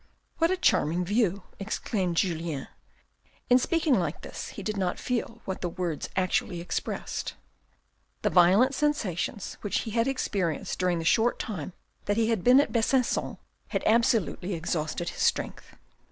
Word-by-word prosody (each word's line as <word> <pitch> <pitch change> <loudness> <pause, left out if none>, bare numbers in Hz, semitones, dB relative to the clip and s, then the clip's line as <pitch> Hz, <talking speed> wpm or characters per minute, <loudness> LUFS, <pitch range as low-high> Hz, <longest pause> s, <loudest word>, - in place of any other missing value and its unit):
"What 330 0 +4
a 375 - +1
charming 180 - +2
view 200 -1 +1
!" - - -29
exclaimed 195 -3 -2
Julien. 165 -6 -1 0.8
In 250 - +8
speaking 325 +1 +1
like 170 -3 -3
this - - -7
he 200 - -8
did 215 +2 -2
not 185 -3 -1
feel 235 -1 -3
what 190 - -4
the 175 - -1
words 170 -4 -3
actually 185 -1 0
expressed. 170 - -4 0.9
The - - +2
violent 190 +9 +5
sensations 220 - -1
which 205 - 0
he 220 - -5
had 230 +2 +1
experienced 195 - -1
during 180 -2 +2
the 165 - -4
short 230 +7 +3
time 190 -5 -5 0.3
that 205 +1 0
he 225 0 +2
had 220 -6 0
been 250 +2 +7
at 285 - +2
Besanc_on 245 +2 +1 0.3
had - - -2
absolutely 220 -5 +2
exhausted 165 0 -2
his - - -7
strength. - - -1
195 Hz, 155 wpm, -28 LUFS, 175-235 Hz, 0.9 s, In